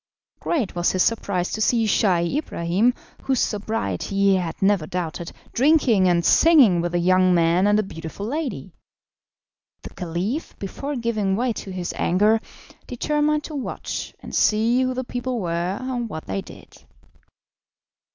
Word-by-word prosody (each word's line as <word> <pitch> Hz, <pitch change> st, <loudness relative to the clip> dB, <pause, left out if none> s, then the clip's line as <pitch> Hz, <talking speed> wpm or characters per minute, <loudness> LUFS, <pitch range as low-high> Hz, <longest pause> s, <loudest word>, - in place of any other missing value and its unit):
Great 265 Hz, -, -1 dB
was 175 Hz, 0 st, 0 dB
his 185 Hz, -, +3 dB
surprise 200 Hz, -5 st, -1 dB
to 215 Hz, -, -3 dB
see 230 Hz, 0 st, +2 dB
Scheih 180 Hz, -4 st, +2 dB
Ibrahim, 190 Hz, -, 0 dB, 0.3 s
whose 265 Hz, -2 st, 0 dB
sobriety 200 Hz, -, -2 dB
he 195 Hz, 0 st, +4 dB
had 175 Hz, -3 st, -4 dB
never 195 Hz, -5 st, +2 dB
doubted, 170 Hz, -1 st, -4 dB, 0.2 s
drinking 250 Hz, -, +4 dB
and 170 Hz, -1 st, +2 dB
singing 270 Hz, -, +5 dB
with 175 Hz, 0 st, -2 dB
a -, -, +2 dB
young 185 Hz, +1 st, +3 dB
man 170 Hz, +3 st, +3 dB
and 205 Hz, 0 st, +4 dB
a 215 Hz, -, +2 dB
beautiful 165 Hz, +1 st, -7 dB
lady. 285 Hz, +4 st, -4 dB, 1.1 s
The -, -, -9 dB
Caliph, 185 Hz, -, -4 dB
before 275 Hz, +9 st, -5 dB
giving 215 Hz, -5 st, -1 dB
way 240 Hz, +2 st, 0 dB
to 200 Hz, -, -8 dB
his 180 Hz, -2 st, -4 dB
anger, 210 Hz, +5 st, +2 dB, 0.5 s
determined 300 Hz, +4 st, 0 dB
to 310 Hz, -, -8 dB
watch 275 Hz, -4 st, -5 dB
and -, -, -10 dB
see 225 Hz, +4 st, +3 dB
who 255 Hz, 0 st, 0 dB
the 255 Hz, -, -2 dB
people 245 Hz, 0 st, -3 dB
were 175 Hz, +1 st, -2 dB
and 250 Hz, -3 st, -3 dB
what 155 Hz, -4 st, -7 dB
they 95 Hz, 0 st, -3 dB
did. -, -, -14 dB
205 Hz, 150 wpm, -23 LUFS, 175-245 Hz, 1.1 s, singing